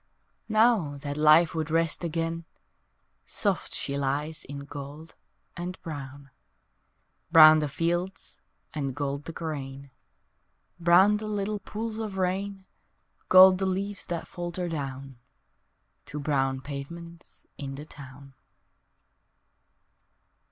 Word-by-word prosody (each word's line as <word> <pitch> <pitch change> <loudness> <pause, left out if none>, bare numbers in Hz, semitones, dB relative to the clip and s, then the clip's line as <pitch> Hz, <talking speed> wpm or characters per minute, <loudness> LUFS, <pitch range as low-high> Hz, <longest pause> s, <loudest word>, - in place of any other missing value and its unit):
Now 215 -10 +3
that 145 0 -5
life 155 +2 +5
would 160 -1 -2
rest 165 +1 0
again 165 0 -2 0.8
Soft 200 -4 -1
she 140 0 -2
lies 145 +3 -2
in 140 0 -7
gold 145 +3 -9 0.4
and 180 +1 -6
brown, 140 -3 -8 1.0
Brown 155 -1 +9
the 150 -1 -1
fields 175 +5 -3 0.3
and 140 -4 -3
gold 140 0 -3
the 165 - -5
grain, 140 -4 -6 0.9
Brown 180 +5 +5
the 215 0 -6
little 210 0 -2
pools 220 +2 -5
of 210 -3 -4
rain, 190 +1 -2 0.6
Gold 185 0 +8
the 190 - 0
leaves 195 +2 -3
that 170 -2 -4
falter 175 0 -4
down 135 -5 -6 0.9
To 150 - -6
brown 135 -2 0
pavements 170 +5 -9
in 135 -1 -5
the 145 +2 -8
town. 140 -2 -13
160 Hz, 110 wpm, -27 LUFS, 140-185 Hz, 1.0 s, Brown